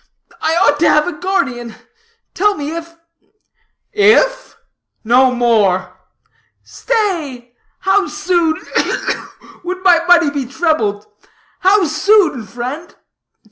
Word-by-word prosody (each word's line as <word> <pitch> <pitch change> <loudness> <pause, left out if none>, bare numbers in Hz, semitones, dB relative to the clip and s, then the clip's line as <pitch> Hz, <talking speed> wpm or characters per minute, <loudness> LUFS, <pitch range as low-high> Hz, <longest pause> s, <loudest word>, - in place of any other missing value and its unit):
I 320 - 0
ought 290 -5 +2
to 330 - +3
have 300 +1 +3
a 355 - -3
guardian. 270 - -3 0.6
Tell 415 +2 +1
me, 295 +2 -5
if 335 0 -8 0.5
" - - -48 0.2
"If? - - -1 0.5
No 250 +3 +4
more!" 220 -7 +1 0.7
"Stay! 320 - -3 0.3
how 385 0 +2
soon 320 +1 0 0.2
ugh, - - +2
ugh! - - -4 0.3
would 365 +1 -5
my 345 -3 +4
money 345 -4 +4
be 280 -3 -4
trebled? 265 -9 -1 0.5
How 390 +2 +3
soon, 320 - +1
friend?" 250 - -7
315 Hz, 115 wpm, -16 LUFS, 250-365 Hz, 0.7 s, No